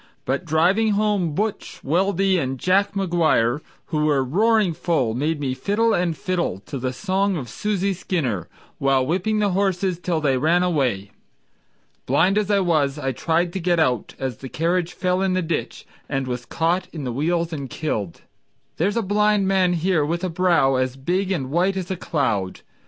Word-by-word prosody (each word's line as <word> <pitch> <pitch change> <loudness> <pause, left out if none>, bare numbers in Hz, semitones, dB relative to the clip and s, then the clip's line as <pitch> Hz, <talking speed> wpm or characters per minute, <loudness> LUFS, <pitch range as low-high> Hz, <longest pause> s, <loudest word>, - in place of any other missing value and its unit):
But 135 +7 -1
driving 185 +8 +2
home 200 -6 0
"Butch" 210 +3 -3
Weldy 190 +4 +2
and 135 -2 -2
Jack 195 +5 +2
McGuire, 160 -9 +2 0.3
Who 150 -1 +2
were 145 -3 +2
roaring 205 - +2
full, 155 -8 0
made 150 +5 -1
me 135 -3 -1
fiddle 220 - +1
and 175 -4 0
fiddle 175 - -1
To 135 +6 -6
the 130 0 -2
song 195 +6 0
of 130 -5 -5
Susie 200 - -1
Skinner, 140 - -2 0.3
while 135 -1 +2
whipping 190 +8 0
the 205 -2 +1
horses 185 -2 0
Till 175 -2 -1
they 135 -4 +1
ran 170 +5 +3
away. 130 - 0 1.0
Blind 190 +5 +3
as 210 -1 -2
I 200 -1 +3
was, 155 -6 +1
I 135 -2 -2
tried 170 +6 0
to 190 - -2
get 175 -1 +1
out 125 -8 0
As 130 -4 -4
the 130 - -8
carriage 170 +5 0
fell 180 0 0
in 190 -1 +1
the 185 -1 0
ditch, 165 -1 -3 0.2
And 135 -2 -1
was 125 -1 -5
caught 175 +3 0
in 155 -4 -6
the 125 -2 -3
wheels 165 +5 0
and 140 -4 -5
killed. 105 - -3 0.6
There's 200 +7 0
a 230 - +1
blind 210 0 +2
man 190 -2 +3
here 170 -2 +1
with 170 +4 -2
a 185 - 0
brow 165 -6 +2
As 130 0 -1
big 180 +8 -1
and 135 -8 -2
white 185 +4 +1
as 185 -1 -4
a - - 0
cloud. 115 - -1
170 Hz, 185 wpm, -22 LUFS, 135-190 Hz, 1.0 s, ran